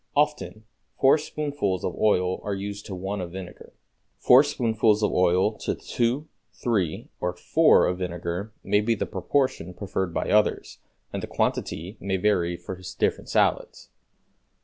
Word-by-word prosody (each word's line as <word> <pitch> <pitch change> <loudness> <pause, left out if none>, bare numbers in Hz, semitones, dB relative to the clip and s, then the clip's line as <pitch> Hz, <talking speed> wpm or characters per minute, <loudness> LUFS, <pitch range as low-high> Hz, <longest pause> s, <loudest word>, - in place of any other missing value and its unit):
Often 145 -7 0 0.4
four 135 +3 +5
spoonfuls 145 - -2
of - - -3
oil 90 -3 +1
are 100 - -2
used 100 +2 -6
to 95 - -5
one 95 +2 -4
of 85 -1 -6
vinegar. 95 -2 -9 0.5
Four 125 +3 +7
spoonfuls 110 -6 +1
of 105 - +2
oil 90 +3 +3
to - - -2
two, 125 +6 -1 0.3
three 100 -10 -2
or 90 0 -1
four - - +4
of 90 0 -1
vinegar 90 +3 -4
may 105 +2 +2
be 115 +2 +1
the - - -2
proportion 130 -10 -1
preferred 95 -2 -3
by - - -2
others, 105 0 +1 0.3
and - - -3
the - - -5
quantity 90 +6 -2
may 95 -1 -1
vary 90 -3 +1
for 95 +1 -8 0.2
different - - 0
salads. - - 0
100 Hz, 150 wpm, -25 LUFS, 90-115 Hz, 0.5 s, Four